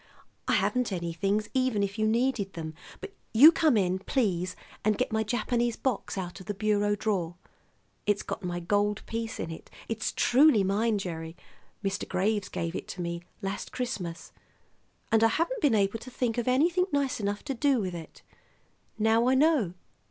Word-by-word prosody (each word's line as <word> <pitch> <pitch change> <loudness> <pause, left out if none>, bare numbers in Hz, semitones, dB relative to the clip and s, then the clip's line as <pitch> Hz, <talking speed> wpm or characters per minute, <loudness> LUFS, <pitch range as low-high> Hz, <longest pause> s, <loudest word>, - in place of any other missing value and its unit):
I - - +2
haven't 250 -3 +1
any 170 -2 -3
things, 200 +5 0
even 255 -6 +1
if 200 +2 -3
you 215 - +2
needed 230 -3 0
them; 160 -2 -6 0.3
but 400 -1 -8 0.2
you 290 +8 +10
come 310 -7 +3
in, 185 -1 +1
please, 185 -6 -1 0.3
and 215 0 +2
get 255 - -1
my 220 0 +1
Japanese 240 +1 0
box 255 -6 -2
out 180 0 -5
of 190 - -12
the 205 - -3
bureau 205 0 +1
drawer. 190 -5 -1 0.7
It's 205 - +2
got - - -5
my 175 -1 -2
gold 205 +4 0
piece 230 +1 -4
in 165 - -4
it. 160 - -10 0.2
It's 225 0 -2
truly 255 -4 +5
mine, 210 +3 +1
Gerry; 165 -4 -5 0.5
Mr. 195 0 -2
Graves 200 +2 0
gave 165 0 -3
it - - -5
to 180 - -6
me 170 0 -3 0.2
last 195 +1 -4
Christmas, 185 -10 -4 0.8
and 225 0 +4
I - - +7
haven't 340 - -1
been 275 -7 +4
able 200 +2 +1
to 245 - -10
think 245 -2 -1
of 240 - -3
anything 335 +8 +3
nice 280 -4 0
enough 205 0 -2
to 280 - -3
do 270 +1 +2
with 185 -4 -3
it. 165 -2 -9 0.7
Now 225 +2 +3
I 260 - +4
know. 270 - +3
215 Hz, 180 wpm, -28 LUFS, 190-250 Hz, 0.8 s, you